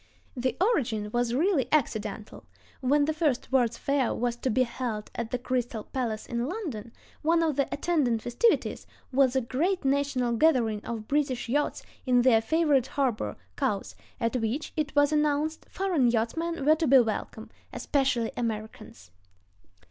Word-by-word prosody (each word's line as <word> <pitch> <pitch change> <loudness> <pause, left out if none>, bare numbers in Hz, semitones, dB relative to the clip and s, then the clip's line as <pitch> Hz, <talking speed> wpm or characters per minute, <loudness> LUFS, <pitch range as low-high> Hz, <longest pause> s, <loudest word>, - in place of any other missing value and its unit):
The 250 -1 -1
origin 235 - 0
was 240 0 0
really 305 -4 +2
accidental. 215 -7 -2 0.3
When 285 +3 +2
the 315 - 0
first 300 -6 -1
World's 240 -3 +2
Fair 275 -3 0
was 240 0 -1
to 260 - -2
be 255 +3 +3
held 235 -3 -4
at 235 -1 -4
the 250 - -1
Crystal 245 -3 -2
Palace 230 -5 -3
in 240 +1 -2
London, 285 - -5 0.3
one 330 +2 +3
of 315 -4 +1
the 280 -1 0
attendant 280 -8 0
festivities 245 - +1 0.3
was 265 -1 +3
a 265 - +3
great 315 +9 -1
national 270 -3 +1
gathering 230 -8 +2
of 225 -2 -5
British 275 -4 0
yachts 290 +5 -1 0.2
in 245 -1 +4
their 235 -3 +5
favorite 290 -1 +2
harbor, 240 - -1 0.2
Cowes, 200 -2 -2 0.3
at 230 +2 -1
which, 235 +6 -3
it 305 -1 -2
was 290 0 +4
announced, 300 +1 0
foreign 350 -10 +1
yachtsmen 275 +7 -1
were 305 - +6
to 320 0 0
be 270 +1 +7
welcome, 220 -2 -1 0.2
especially 265 -5 0
Americans. 215 - -5
255 Hz, 155 wpm, -27 LUFS, 230-295 Hz, 0.3 s, be